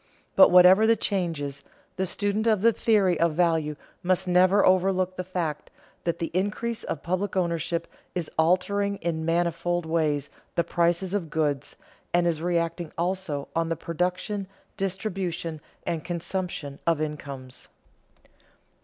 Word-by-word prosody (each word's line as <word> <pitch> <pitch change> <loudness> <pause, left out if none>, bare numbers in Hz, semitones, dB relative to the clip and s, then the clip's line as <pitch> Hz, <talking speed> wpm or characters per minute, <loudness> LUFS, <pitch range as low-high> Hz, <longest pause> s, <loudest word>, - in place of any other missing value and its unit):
But 285 - +8
whatever 180 +4 +7
the 230 - +5
changes, 165 -10 -2 0.3
the 190 0 -1
student 205 +4 -1
of 215 -3 +3
the 230 0 +6
theory 200 -8 +2
of 170 -1 +3
value 160 -3 +2 0.3
must 185 0 +1
never 185 +3 +5
overlook 185 0 +2
the 185 - -3
fact 170 -5 -3 0.4
that 170 -1 0
the 165 - -3
increase 215 +5 -1
of - - -4
public 185 +3 -1
ownership 170 -1 0 0.3
is 175 -3 -2
altering 200 +5 +2
in 165 -3 -3
manifold 170 +1 0
ways 155 -3 0 0.2
the 170 - +2
prices 175 +3 +1
of 185 -6 -1
goods, 150 -3 -1 0.4
and 175 0 +3
is 165 -2 0
reacting 170 -1 -1
also 170 -5 -2
on 165 0 +1
the 165 - 0
production, 180 +5 -2 0.3
distribution, 180 -5 -3 0.2
and 165 -2 -2
consumption 170 -4 -4
of 165 -2 +3
incomes. 140 -4 -6
175 Hz, 135 wpm, -26 LUFS, 165-190 Hz, 0.4 s, But